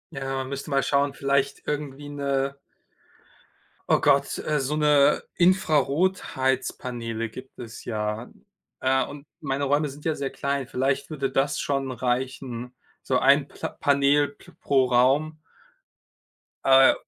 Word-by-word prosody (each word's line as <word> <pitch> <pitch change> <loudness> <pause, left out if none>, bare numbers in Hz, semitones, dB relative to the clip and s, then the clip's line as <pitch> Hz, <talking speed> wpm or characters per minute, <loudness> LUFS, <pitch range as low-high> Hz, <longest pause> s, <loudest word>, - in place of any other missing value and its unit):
Ja, 135 0 -3
man 130 0 -3
müsste 140 0 -5
mal 135 -1 +2
schauen, 140 0 +1
vielleicht 140 0 0
irgendwie 145 -1 -4
'ne 140 -1 -1 1.3
oh - - +5
Gott, 140 -1 +2
äh, 150 -2 -1
so 145 +3 -1
'ne 150 -2 +4
Infrarotheizpaneele 135 - 0
gibt 130 +4 -12
es 120 -1 -9
ja, 105 0 -3 0.5
äh, 130 0 +2
und 145 0 -10 0.2
meine 140 -1 -1
Räume 145 +2 +1
sind 145 +2 -12
ja 160 - +1
sehr 140 -1 -3
klein, 140 -2 -2
vielleicht 135 +2 -1
würde 140 -4 -2
das 135 +3 0
schon 135 -2 -1
reichen, 125 0 -3 0.3
so 130 -1 +1
ein 140 +2 +4
Pla - - -5
Panel 140 +1 +2
p 140 - -18
pro 135 -2 +3
Raum. 135 +6 +2 1.3
Äh 135 0 +7
135 Hz, 135 wpm, -25 LUFS, 130-145 Hz, 1.3 s, Äh